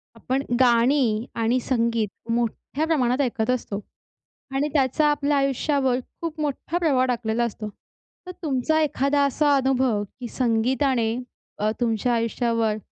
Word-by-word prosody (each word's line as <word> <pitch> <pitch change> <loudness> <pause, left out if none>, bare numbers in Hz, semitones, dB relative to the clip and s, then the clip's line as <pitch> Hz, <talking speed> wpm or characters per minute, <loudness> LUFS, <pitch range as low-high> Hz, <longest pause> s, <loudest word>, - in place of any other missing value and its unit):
आपण 260 +4 -1 0.2
गाणी 240 -2 +3
आणि 230 +2 +1
संगीत 230 -3 -1
मोठ्या 240 +6 -1
प्रमाणात 260 -4 +2
ऐकत 235 -3 -1
असतो. 235 -5 -1 0.8
आणि 285 +2 +1
त्याचा 285 +1 +2
आपल्या 290 0 +1
आयुष्यावर 275 -1 +1 0.2
खूप 325 -2 -4
मोठा 300 +3 -2
प्रभाव 275 -7 +2
टाकलेला 235 -1 0
असतो. 215 -2 -4 0.6
तर 365 - -4
तुमचा 300 +1 +1
एखादा 285 -1 +1
असा 285 +1 +2
अनुभव 260 -5 +1 0.2
की 245 - -5
संगीताने 240 0 +1 0.4
अ, 215 +1 +1
तुमच्या 235 0 +1
आयुष्यावर 230 -1 0
255 Hz, 125 wpm, -24 LUFS, 230-280 Hz, 0.8 s, गाणी